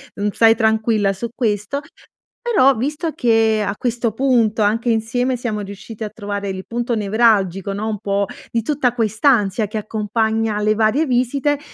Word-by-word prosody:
mhmm, 205 +1 -1
stai 225 +2 +5
tranquilla 220 -3 +1
su 230 +5 -5
questo. 220 +3 -1 0.6
Però, 390 - +4
visto 295 +7 -2
che 225 -2 +2
a 200 - -2
questo 240 -1 -1
punto 230 -3 +2
anche 225 +3 +1
insieme 245 +3 0
siamo 220 -3 -3
riusciti 205 +2 -8
a 215 - -3
trovare 205 -1 -5
il 190 0 -5
punto 240 0 -2
nevralgico, 200 -3 +2
no, 210 +2 -3
un 215 -2 -3
po' 200 -1 0 0.3
di 230 - 0
tutta 260 0 0
quest'ansia 220 -2 +1
che 215 - -5
accompagna 220 0 -1
le 215 +1 +2
varie 225 +8 +2
visite, 275 +3 0
220 Hz, 160 wpm, -19 LUFS, 210-240 Hz, 0.6 s, stai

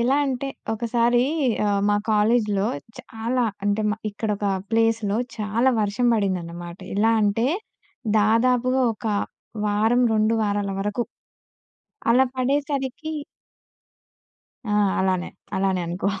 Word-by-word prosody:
ఎలా 255 +4 +3
అంటే 270 +1 -2 0.2
ఒకసారి 235 +2 +2 0.4
ఆహ్, 200 -1 +2
మా 205 - +3 0.2
కాలేజ్‌లో 210 -1 +2 0.3
చాలా 235 +3 -2 0.2
అంటే 205 +1 +1
మ - - +1 0.2
ఇక్కడొక 205 -1 -2 0.2
ప్లేస్‌లో 225 -2 +2 0.2
చాలా 220 +5 +1
వర్షం 210 +4 0
పడిందన్నమాట. 175 -4 -3 0.2
ఎలా 225 +2 +4
అంటే 210 +4 +2 0.7
దాదాపుగా 250 +4 +3
1 225 - -8 0.6
వారం, 220 +4 +2
2 215 +1 +2
వారాల 205 -1 0
వరకు. 210 +4 -1 1.1
అలా 260 +3 +5
పడేసరికి 280 +3 -1 1.6
ఆ! - - +1 0.3
అలానే. 185 -1 0 0.3
అలానే 190 -1 +1
అనుకో. 180 +3 -1
220 Hz, 105 wpm, -23 LUFS, 205-245 Hz, 1.6 s, అలా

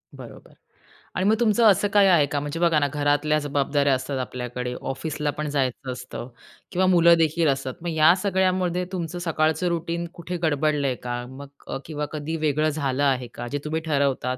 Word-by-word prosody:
बरोबर - - -12 0.6
आणि 185 - 0
मग 220 - +4
तुमचं 230 0 +3
असं 200 +2 +1
काही 205 -1 +6
आहे 170 -6 +5
का? 145 0 -2
म्हणजे 145 +3 -4
बघा 170 -3 +3
ना, 145 - +1
घरातल्या 145 +1 +1
जबाबदाऱ्या 145 -1 +1
असतात 130 +1 -4
आपल्याकडे, 125 -1 -4
ऑफिसला 150 +2 -3
पण 150 +1 -4
जायचं 130 -2 -2
असतं 125 0 -7 0.4
किंवा 185 +1 +1
मुलं 170 -2 +6
देखील 165 0 +2
असतात, 135 -1 -2
मग 175 - -3
या 160 +2 +6
सगळ्यामध्ये 185 -2 +1
तुमचं 175 -2 -4
सकाळचं 160 0 0
रुटीन 170 0 -2
कुठे 175 0 -5
गडबडलंय 145 -3 +1
का? 120 0 -4
मग 140 +2 -10 0.2
क - - -3
किंवा 150 -2 -4
कधी 155 +1 -4
वेगळं 155 0 +1
झालं 145 -2 -1
आहे 130 -3 +1
का? 120 - -6
जे 145 - -3
तुम्ही 160 +1 -2
ठरवतात, 140 -4 0
150 Hz, 180 wpm, -24 LUFS, 140-170 Hz, 0.6 s, काही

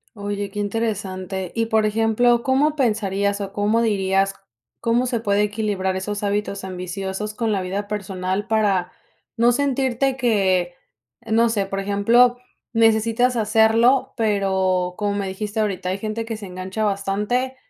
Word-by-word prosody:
Oye, 205 -1 -4
qué 205 - -6
interesante. 195 -4 -3
Y, 230 -1 0
por 220 -1 +2
ejemplo, 225 +3 +2
¿cómo 285 +3 +2
pensarías 205 -6 0
o 195 -1 -5
cómo 210 +3 +1
dirías 195 -3 +1 0.5
como 235 +2 +1
se 245 -2 -1
puede 205 -2 +1
equilibrar 205 -3 -1
esos 205 +2 -4
hábitos 205 0 -2
ambiciosos 190 +3 -4
con 225 0 -1
la 200 -2 0
vida 195 +3 -3
personal?, 195 -1 -3
para 205 -5 +1 0.4
no 235 +1 +4
sentirte 265 0 0
que, 190 -8 +1 0.5
no 230 +1 +3
sé, 205 -3 0
por 195 0 -3
ejemplo, 230 +5 +3 0.4
necesitas 225 +2 +3
hacerlo, 225 +3 +3
pero 190 -4 +1
como 205 -1 -1
me 200 -1 -2
dijiste 205 +3 -4
ahorita, 195 -4 -1
hay 190 - -1
gente 220 +2 -3
que 225 -1 -4
se 210 - -8
engancha 185 +4 -4
bastante. 210 +6 -1
210 Hz, 145 wpm, -22 LUFS, 195-230 Hz, 0.5 s, no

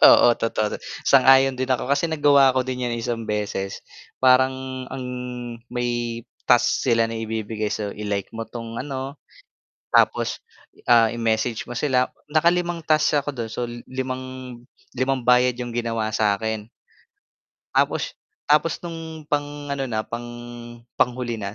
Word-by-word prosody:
Oo - - +7
totoo 110 -2 -1 0.3
sang-ayon 135 0 +6
din 130 +1 -2
ako 125 - -1
kasi 140 +4 +2
nagwa 145 -4 +5
ako 130 - +2
din 125 -1 -2
yan 120 - -2
isang 115 0 -3
beses, 105 -2 -3 0.4
parang 130 0 +3
ang 130 -1 -5 0.7
may 120 -1 -2 0.2
task 120 -1 +3
sila 115 -3 +3
na 115 - -4
ibibigay 110 -1 -3
so 105 -1 -2
i-like 100 -2 -2
mo 115 - -3
'tong 115 0 -7
ano, 135 0 -5 0.8
tapos - - +3 0.5
ah, 115 -1 +7
i-message 115 0 -1
mo 120 - -4
sila 130 -3 +2 0.2
naka 160 +2 +4
5 175 -1 -1
tasks 155 -1 +3
ako 145 - -3
dun 115 -3 -4
so 120 - -4 0.3
limang 130 0 -5 0.4
limang 130 0 +1
bayad 125 +1 +4
'yung 120 -1 -4
ginawa 115 -2 -1
sa 105 -2 +3
akin. 110 0 -3 1.1
Tapos - - +1 0.4
tapos 150 +3 +3
nung 165 -2 -7
pang 145 0 -2
ano 140 -1 -1
na, 110 -3 -1
pang 120 +1 -6 0.7
panghuli 120 -2 0
na 100 -1 -5
125 Hz, 140 wpm, -23 LUFS, 115-135 Hz, 1.1 s, Oo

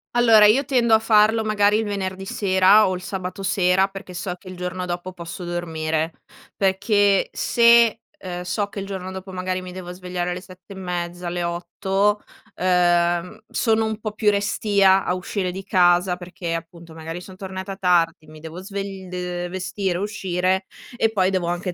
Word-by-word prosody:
Allora, 225 -3 +7
io 255 +7 +4
tendo 245 -4 +2
a - - +4
farlo 220 0 +4
magari 210 -1 +3
il 225 - 0
venerdì 195 -2 -4
sera 195 +2 +4
o 185 - -1
il 180 - -7
sabato 185 +1 -5
sera, 190 -1 +3
perché 195 -1 -10
so 175 +1 -3
che 185 - -18
il 185 - -8
giorno 180 0 -4
dopo 175 +1 -4
posso 170 0 -8
dormire 160 -2 -2 0.4
perché 200 +1 +2
se, 235 -1 +4 0.2
ehm, 180 -1 -6
so 200 +3 -2
che 200 - -7
il 195 - -5
giorno 190 -1 -5
dopo 190 0 -8
magari 185 0 -3
mi 180 0 -8
devo 180 -1 -8
svegliare 180 -1 -4
alle 180 +1 -4
7 185 +1 -14
e - - -12
mezza, 175 -1 -4
alle 175 0 -2
8, 190 +4 -1 0.3
ehm, 175 +2 +1
sono 225 -1 +1
un 220 0 -3
po' 215 -1 -4
più 210 -1 +2
restia 200 -1 +3
a - - +1
uscire 185 +1 -3
di 190 +2 -7
casa, 180 -1 +3
perché 175 -1 -5
appunto, 165 -1 -9
magari 165 +2 -6
son 185 0 -12
tornata 190 0 -6
tardi, 170 -4 +1
mi 155 0 -13
devo 160 +3 -8
svegl 195 -2 -6
ehm, 180 -1 -4
vestire, 185 0 -2
uscire, 190 -2 -1 0.3
e 225 -1 +1
poi 190 -3 +2
devo 185 -3 -1
anche 175 +1 -2
185 Hz, 180 wpm, -22 LUFS, 175-200 Hz, 0.4 s, Allora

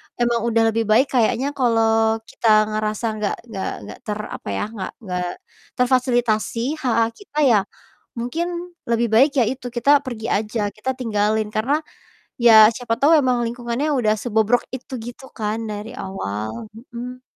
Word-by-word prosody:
emang 235 -1 0
udah 230 -1 +3
lebih 225 0 -1
baik 235 +6 +3
kayaknya 250 +2 +1
kalau 225 -4 +2
kita 225 - -4 0.2
ngerasa 215 +1 -2
gak 210 -1 -1 0.2
gak 195 -3 -3 0.2
gak 105 - -10
ter 210 0 -3
apa - - -8
ya, - - -1 0.2
gak 190 - -4
gak 180 -3 -3 0.5
terfasilitasi 245 +1 +1
hak-hak 230 -4 +1
kita 400 -7 -13
ya, 215 - +5 0.6
mungkin 285 +9 -2 0.4
lebih 235 0 +2
baik 270 +6 +6
ya - - +5
itu, 255 -1 -6
kita 280 +4 +5
pergi 230 -3 -5
aja, 215 +2 -1
kita 215 +6 -3
tinggalin, 215 -2 0
karena 235 +7 +1 0.6
ya 220 -2 +8
siapa 240 -2 -2
tau 285 +4 +4
emang 250 -3 +1
lingkungannya 240 +4 -2
udah 215 -4 +2
sebobrok 220 +1 +1
itu, 260 +1 -10
gitu 245 +3 -9
kan, 215 0 -1
dari 210 +2 -6
awal, 110 - -5 0.3
mhm. 250 +1 -6
230 Hz, 150 wpm, -21 LUFS, 215-250 Hz, 0.6 s, ya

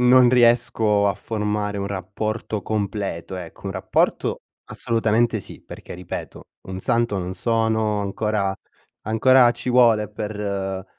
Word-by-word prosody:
Non 125 0 +6
riesco 115 -4 +3
a 100 - +1
formare 105 0 -2
un 100 - -2
rapporto 105 +2 -4
completo, 100 -4 -3
ecco; 90 +1 -9
un 95 - -3
rapporto, 95 -1 0 0.3
assolutamente 115 0 0
sì, 100 - -10
perché, - - -10
ripeto, 90 0 -7 0.2
un 95 0 -7
santo 115 -4 0
non 90 +1 -4
sono, 110 0 0
ancora 100 0 -1 0.5
ancora 120 +3 +5
ci 125 +1 -4
vuole 115 -4 +4
per 100 -3 -4
105 Hz, 125 wpm, -22 LUFS, 100-115 Hz, 0.5 s, Non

